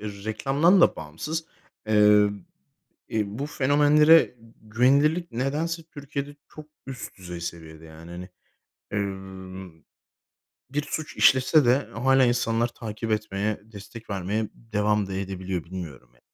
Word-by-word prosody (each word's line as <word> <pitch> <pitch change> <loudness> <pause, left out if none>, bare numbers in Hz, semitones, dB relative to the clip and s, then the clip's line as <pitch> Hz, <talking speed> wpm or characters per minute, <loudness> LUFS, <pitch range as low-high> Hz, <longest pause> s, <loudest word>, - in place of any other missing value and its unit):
reklamdan 110 - +1
da - - +5
bağımsız, 85 - -5 0.4
ııı, 105 -1 +5 0.8
iii, 105 +1 -2
bu 140 - -1
fenomenlere 150 +1 +4 0.3
güvenilirlik 140 +9 +2
nedense 150 +7 -2
Türkiye'de 145 -2 -7
çok 155 -1 -11 0.2
üst 130 -5 -8
düzey 90 -2 -8
seviyede 80 -1 -8
yani 80 +2 -12
hani, 90 +2 -8 0.7
ııı, 95 -2 -5 1.0
bir 145 +2 -1
suç 155 +1 -5
işlese 135 +3 +5
de 130 +3 +3
hâlâ 135 +3 +3
insanlar 120 -1 +1
takip 115 -1 -6
etmeye, 105 0 -2
destek 105 +2 -11
vermeye 100 +3 -2
devam 105 -2 0
da 95 - -6
edebiliyor 95 -2 -4
bilmiyorum 80 -9 -8
ya. - - -29
110 Hz, 120 wpm, -25 LUFS, 95-140 Hz, 1.0 s, da